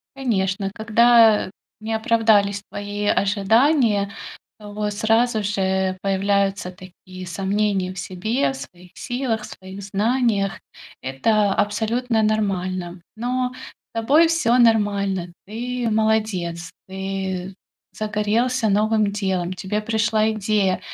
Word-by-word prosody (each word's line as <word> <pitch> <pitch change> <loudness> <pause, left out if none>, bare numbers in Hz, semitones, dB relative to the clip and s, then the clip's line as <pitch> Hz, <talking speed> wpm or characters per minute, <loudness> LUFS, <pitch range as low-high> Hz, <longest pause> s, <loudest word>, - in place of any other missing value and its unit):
Конечно, 195 -7 -1
когда, 225 0 +4
э, - - -11 0.3
не 220 +1 -3
оправдались 220 -3 +2
твои 205 0 -4
ожидания, 205 +1 +2 0.5
вот 210 0 -4
сразу 225 +1 +1
же 190 -2 0
появляются 195 -1 0
такие 185 0 -12
сомнения 195 +1 -1
в 185 - -7
себе, 215 +11 -1
в - - -8
своих 180 -6 -12
силах, 245 -3 -2
в - - -7
своих 190 +1 -10
знаниях. 205 0 0 0.4
Это 200 - +1
абсолютно 225 +3 0
нормально. 185 -4 -1 0.2
Но 250 +2 -1
с 255 - -14
тобой 295 +9 +4
всё 255 -8 +2
нормально. 200 -6 +2
Ты 240 +3 -3
молодец, 210 -6 0 0.2
ты 190 -1 -4 0.4
загорелся 220 +3 0
новым 215 0 +2
делом, 190 -3 -2
тебе 190 +3 -3
пришла 220 0 +1
идея, 205 -3 0
210 Hz, 110 wpm, -22 LUFS, 190-225 Hz, 0.5 s, когда